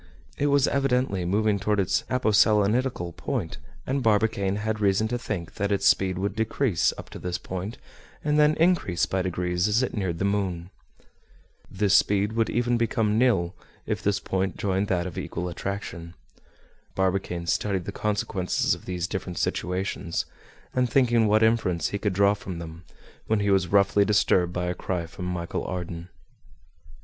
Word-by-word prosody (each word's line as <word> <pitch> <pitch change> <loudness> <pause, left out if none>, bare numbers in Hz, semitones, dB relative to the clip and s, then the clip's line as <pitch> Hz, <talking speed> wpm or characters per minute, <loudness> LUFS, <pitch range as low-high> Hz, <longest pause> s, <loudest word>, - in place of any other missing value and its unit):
It 145 - 0
was 140 -1 +3
evidently 125 -9 +1
moving 105 +2 +1
toward 105 +1 0
its 95 -1 +1
aposelenitical 110 -4 +2
point; - - -3 0.3
and 135 +1 -1
Barbicane 105 -3 +2
had 110 +1 -2
reason 100 +1 +2
to 120 +1 -2
think 95 -8 -5
that 100 -1 -1
its 100 0 0
speed 95 -1 +3
would 100 +1 -2
decrease 110 -3 +1
up - - -10
to - - -8
this 90 -1 -3
point, 95 +5 -6 0.5
and 150 0 +2
then 150 0 +5
increase 160 - +2
by 95 0 -1
degrees 90 0 -1
as 110 +4 +2
it 125 - -2
neared 95 -5 -2
the 95 - -1
moon. 95 -3 -1 1.0
This 100 0 +2
speed 100 +1 +3
would 115 0 +1
even 120 0 +1
become 110 -2 +1
nil, 95 -9 +2 0.3
if - - -2
this 100 -1 +1
point 95 -1 -2
joined 95 0 0
that 90 -3 0
of 90 - -5
equal 90 - -4
attraction. 90 -2 -5 0.8
Barbicane 95 -2 -1
studied 95 +1 0
the - - -4
consequences 105 -3 0
of - - -7
these 90 -2 -2
different 90 -1 -5
situations, 90 -2 -2 0.5
and 125 -1 +1
thinking 120 -3 +3
what 110 +1 +4
inference 110 -8 +2
he 100 - -3
could 100 -1 -1
draw 100 +2 +4
from 95 -3 -7
them, 85 +1 -9 0.4
when 110 -1 +2
he 100 0 +1
was 95 -2 +3
roughly 100 +2 +4
disturbed 95 -4 +2
by 90 0 -2
a 90 - -1
cry 90 -2 -3
from 90 +2 -6
Michel 85 -1 -3
Ardan. 90 -1 -5
100 Hz, 165 wpm, -26 LUFS, 90-110 Hz, 1.0 s, then